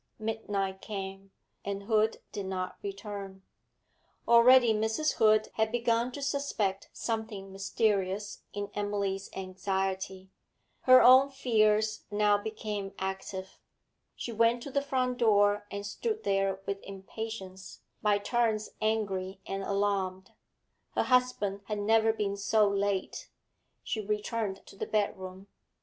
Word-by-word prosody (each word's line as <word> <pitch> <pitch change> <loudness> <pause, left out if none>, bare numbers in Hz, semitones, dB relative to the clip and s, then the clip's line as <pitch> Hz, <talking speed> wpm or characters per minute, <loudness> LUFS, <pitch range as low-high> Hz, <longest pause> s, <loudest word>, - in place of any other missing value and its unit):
Midnight 205 -3 -3
came, 195 -1 -6 0.3
and 200 0 -4
Hood 220 +1 +1
did 200 -2 -4
not 185 -1 -3
return. 195 -1 -7 0.8
Already 235 0 +7
Mrs. 220 +8 0
Hood 215 0 +4
had 220 0 +2
begun 235 0 +1
to 285 - -5
suspect 250 -9 -1
something 220 -4 -4
mysterious 195 0 -1
in 205 0 -5
Emily's 200 -1 -2
anxiety; 190 0 -3 0.5
her 255 0 +8
own 260 +2 +8
fears 215 -5 +2
now 210 0 +3
became 205 -1 -4
active. 190 0 -5 0.6
She 235 - -5
went 230 +2 +2
to 280 - -7
the 280 - +1
front 255 -2 -1
door 205 -2 +3
and 200 0 -5
stood 435 - -3
there 195 -1 +1
with 200 0 -3
impatience, 195 -1 -8 0.2
by 210 -2 +3
turns 220 0 0
angry 195 -4 -1
and 195 0 -3
alarmed. 195 -2 -1 0.6
Her - - +3
husband 250 -6 +1
had 210 +1 -3
never 220 +2 +3
been 205 -2 -2
so 210 +1 +3
late. 200 -1 -1 0.5
She 220 - -2
returned 210 -1 -2
to - - -14
the - - -4
bedroom. 190 -2 -2
205 Hz, 125 wpm, -30 LUFS, 195-225 Hz, 0.8 s, her